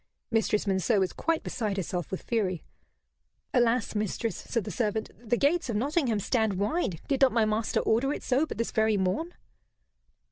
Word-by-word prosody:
Mistress 220 -2 +1
Monceux 195 +2 +2
was 190 -2 0
quite 330 -1 0
beside 210 -4 -2
herself 180 -3 -3
with 190 - -5
fury. 195 -7 -1 0.9
"Alas, 240 -2 +2
mistress," 215 +2 -1
said 230 -3 -2
the - - -5
servant, 220 -2 -1
"the 240 +1 +1
gates 300 +2 +2
of 230 - -1
Nottingham 260 -1 +1
stand 220 0 +1
wide; 205 - -1
did 275 -2 0
not 265 -2 +6
my 225 -1 +3
master 215 +1 0
order 245 +5 +2
it - - -4
so 275 +5 +2
but - - -6
this 230 - -1
very 220 -1 +2
morn?" 195 - -1
225 Hz, 175 wpm, -28 LUFS, 205-255 Hz, 0.9 s, not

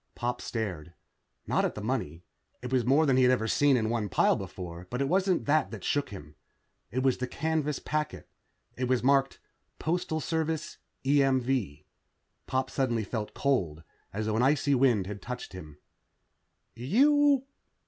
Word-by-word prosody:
Pop 120 0 -3
stared. 90 -8 -4 0.5
Not - - +1
at - - -1
the - - -5
money. 80 +4 -3 0.4
It 125 - -5
was 125 -2 +3
more 140 +7 +4
than 135 -3 +3
he - - +5
had 125 0 +5
ever 115 -3 +1
seen 140 +3 +3
in 110 -2 0
one 110 -3 -1
pile - - +3
before, 90 -1 -7
but 125 - -3
it 140 - +1
wasn't 185 +2 +1
that 150 0 +2
that 105 -5 -8
shook 145 -1 0
him. 75 -7 -10 0.6
It 130 +3 -2
was 130 -2 +2
the 125 - -2
canvas 150 +1 -1
packet. 150 -1 -3 0.5
It 125 0 -2
was 125 -1 +1
marked: 135 0 +2 0.4
Postal 160 -1 -1
Service, 160 0 -2 0.3
EMV. 130 - +1 0.6
Pop 130 0 -1
suddenly 120 -5 0
felt 105 0 -5
cold, 90 - 0 0.3
as 105 +2 -3
though 110 0 -1
an - - +2
icy 140 +2 +3
wind 125 -7 +3
had 100 +1 -7
touched 125 -3 -7
him. 75 -5 -10 1.0
"You 275 - +3
130 Hz, 165 wpm, -29 LUFS, 110-145 Hz, 1.0 s, he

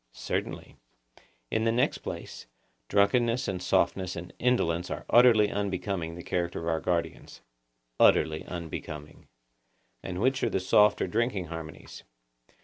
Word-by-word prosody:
Certainly. - - -4 0.7
In 110 - +1
the 115 - +2
next 120 +2 +1
place, - - -8 0.4
drunkenness 115 +4 +2
and 90 -2 -3
softness 95 0 +1
and 85 +1 -8
indolence 90 -9 +1
are - - -5
utterly 115 -4 +6
unbecoming 95 -4 -3
the 85 - -9
character 85 -1 -2
of 85 - -5
our 80 -1 +1
guardians. 85 -1 -3 0.6
Utterly 80 0 +4
unbecoming. 75 -3 -7 0.7
And 90 -1 -5
which 130 +4 +1
are - - +2
the - - 0
soft 105 +3 +4
or - - -1
drinking 105 -3 -1
harmonies? 80 -1 -9
95 Hz, 135 wpm, -28 LUFS, 85-110 Hz, 0.7 s, utterly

